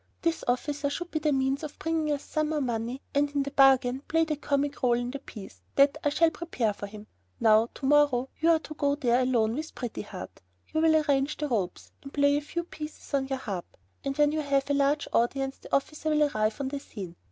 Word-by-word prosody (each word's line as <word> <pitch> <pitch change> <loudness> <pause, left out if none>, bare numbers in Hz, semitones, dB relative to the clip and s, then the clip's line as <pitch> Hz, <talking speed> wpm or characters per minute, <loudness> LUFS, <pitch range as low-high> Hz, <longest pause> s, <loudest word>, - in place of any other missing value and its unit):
This 335 -1 0
officer 285 +3 0
should 350 +4 -5
be 310 - -1
the 305 0 +1
means 270 0 +1
of 305 -2 -7
bringing 320 -2 -1
us 285 -1 -2
some 310 -1 -1
more 310 -1 0
money 240 0 -3
and, 290 0 +2
in 280 - +2
the 280 - -5
bargain, 270 -2 +4
play 325 0 +2
the 310 -1 -1
comic 285 0 -1
rôle 240 -1 +2
in 245 0 -3
the 280 - -5
piece 210 -7 -11
that 280 +1 +5
I 290 - +3
shall 325 +3 +3
prepare 250 -12 -1
for 205 - -7
him. 210 +1 -11 0.3
Now, 220 +1 +5
to - - -6
morrow, 275 -3 +4
you 325 - +3
are 330 - +6
to 315 -1 -9
go 285 -1 +1
there 250 -3 +2
alone 235 -4 +2
with 310 +5 -5
Pretty 240 -3 -4
Heart. - - -9 0.3
You 315 - +2
will 320 -1 +5
arrange 290 -2 +2
the 300 - -2
ropes, 195 -7 -2
and 275 - -10
play 285 0 +3
a 290 - +1
few 340 +4 -4
pieces 305 -3 -9
on 270 -1 +1
your 270 0 -2
harp, 200 -9 -6 0.3
and 275 0 -3
when 295 0 +4
you 310 0 -1
have 280 -1 +1
a - - +3
large 285 +1 +2
audience 270 +3 0
the - - -13
officer 305 +3 -1
will 305 -1 +3
arrive 215 -6 0
on 270 -1 -2
the 285 0 -4
scene. 190 -10 -8
280 Hz, 235 wpm, -28 LUFS, 250-300 Hz, 0.3 s, are